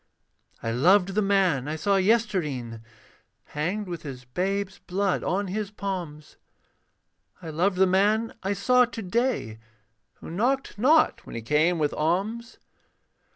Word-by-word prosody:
I 115 - -1
loved 180 - +4
the 200 +2 0
man 190 -9 +2
I 155 - -2
saw 200 +5 +1
yestreen 185 - 0 0.6
Hanged 180 +8 -3
with 170 -2 -5
his 130 -5 -8
babe's 190 +7 -2
blood 195 +1 -1
on 195 +3 0
his 200 +2 -3
palms. 180 -7 -6 1.0
I 165 -3 -7
loved 180 +5 0
the 190 - +5
man 205 +5 +2
I 195 +2 -1
saw 250 +6 +4
to 235 -1 -7
day 190 - -1 0.6
Who - - -10
knocked 245 +5 -1
not 305 +7 +4
when - - -8
he 115 - -5
came 155 +7 +2
with 150 -2 0
alms. 200 +9 -2
190 Hz, 140 wpm, -26 LUFS, 155-210 Hz, 1.0 s, the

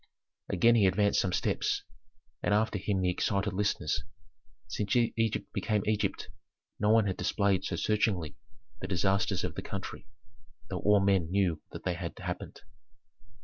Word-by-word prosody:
Again 115 +5 +4
he 105 -4 +5
advanced 100 +2 +3
some 95 - -1
steps, - - 0 0.6
and 105 - +2
after 110 -1 +1
him 95 0 0
the 90 -1 +2
excited 100 +2 0
listeners. 100 +1 0 0.7
Since 105 -2 -1
Egypt 115 -2 0
became 105 -3 0
Egypt, 105 -2 -1 0.5
no 105 - +2
one 110 -1 +5
had 95 -2 -1
displayed 100 0 +1
so - - -2
searchingly 100 -7 0 0.4
the - - -5
disasters 95 0 +1
of 90 -3 -2
the - - -5
country, 100 +1 -6 0.6
though 90 - -2
all 105 -1 +4
men 95 -4 +2
knew 90 -5 +1
that - - -8
they - - 0
had - - -6
happened. - - -6
100 Hz, 150 wpm, -30 LUFS, 95-105 Hz, 0.7 s, he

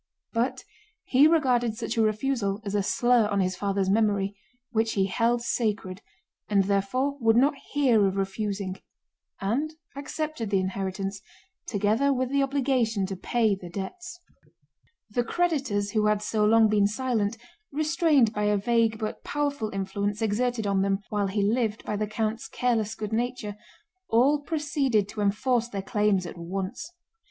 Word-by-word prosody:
But 250 +2 -1 0.4
he 270 +4 +5
regarded 250 -8 +2
such 225 -1 -3
a 225 - +2
refusal 215 -2 0
as 200 - -3
a 205 - +2
slur 240 +2 +3
on 200 -1 0
his 185 -1 0
father's 195 -1 -1
memory, 200 -1 +1 0.4
which 225 -1 +1
he 195 -2 +2
held 235 +4 +1
sacred, 210 -5 -2 0.5
and 200 -2 +4
therefore 230 +9 0
would 225 -1 +4
not 270 +5 +4 0.2
hear 245 -8 +4
of 190 - -2
refusing 195 -1 -2 0.6
and 270 +11 -1 0.2
accepted 285 -4 -4
the 195 -1 +2
inheritance 195 +1 -3 0.5
together 215 +7 +2
with 260 -1 0
the 280 0 +2
obligation 260 -7 +1
to 195 0 -4
pay 220 +3 +1
the 185 -2 -7
debts. 350 - -7 0.9
The 240 +3 +1
creditors 265 -10 0
who 215 -1 +2
had 210 0 +1
so 210 -1 +1
long 225 +1 +5
been 210 -1 +3
silent, 225 -2 -1 0.3
restrained 305 -5 +2
by 210 0 -1
a 210 0 +3
vague 225 +1 +2
but 215 -1 -5
powerful 285 -6 -2
influence 200 +1 -2
exerted 225 +1 0
on 195 -1 +1
them 195 0 0
while 205 -2 0
he 200 +1 0
lived 220 0 0
by 210 - -2
the 210 +1 -1
count's 220 +1 -2
careless 225 -3 0
good 215 0 -5
nature, 240 -2 -2 0.5
all 270 +6 +4
proceeded 285 - 0
to 210 - -5
enforce 235 +4 +1
their 195 -4 -4
claims 205 -2 +1
at 175 - -8
once. 190 - -5
220 Hz, 155 wpm, -26 LUFS, 200-250 Hz, 0.9 s, he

